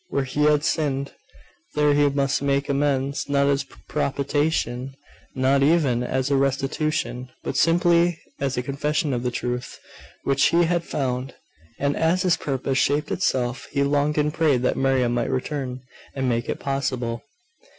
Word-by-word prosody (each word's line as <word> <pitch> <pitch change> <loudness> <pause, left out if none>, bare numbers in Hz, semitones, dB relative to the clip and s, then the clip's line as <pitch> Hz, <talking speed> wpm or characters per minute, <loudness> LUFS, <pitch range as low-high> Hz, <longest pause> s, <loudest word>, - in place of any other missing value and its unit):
Where 140 - -1
he 145 +3 0
had 150 -1 +3
sinned, 140 -3 -1 0.6
there 150 -1 +3
he 145 0 +4
must 140 -1 0
make 140 0 +1
amends; 140 -1 0
not 140 0 +3
as 140 0 +2
a 135 - -11 0.2
propitiation, 140 -3 -1 0.4
not 135 +1 +2
even 140 -5 +3
as 130 +2 -1
a - - +4
restitution; 135 -1 -1
but - - -3
simply 170 +2 +3 0.2
as 135 -2 -1
a 125 - 0
confession 145 +3 -1
of 120 - -1
the 125 - -1
truth 125 0 -4 0.4
which 140 0 +2
he 170 +1 +3
had 170 0 +1
found. 130 -4 -3 0.4
And 140 0 0
as 170 +3 +2
his 180 -3 +3
purpose 135 -1 -1
shaped 145 +2 +1
itself, 130 -7 -1
he 140 - 0
longed 145 +1 +1
and 150 0 +1
prayed 145 -7 +2
that - - +1
Miriam 130 -3 +2
might 120 -1 0
return, 130 -1 -3 0.3
and 135 -1 -1
make 120 -1 -1
it - - -2
possible. 130 -4 -2
140 Hz, 160 wpm, -23 LUFS, 130-150 Hz, 0.6 s, he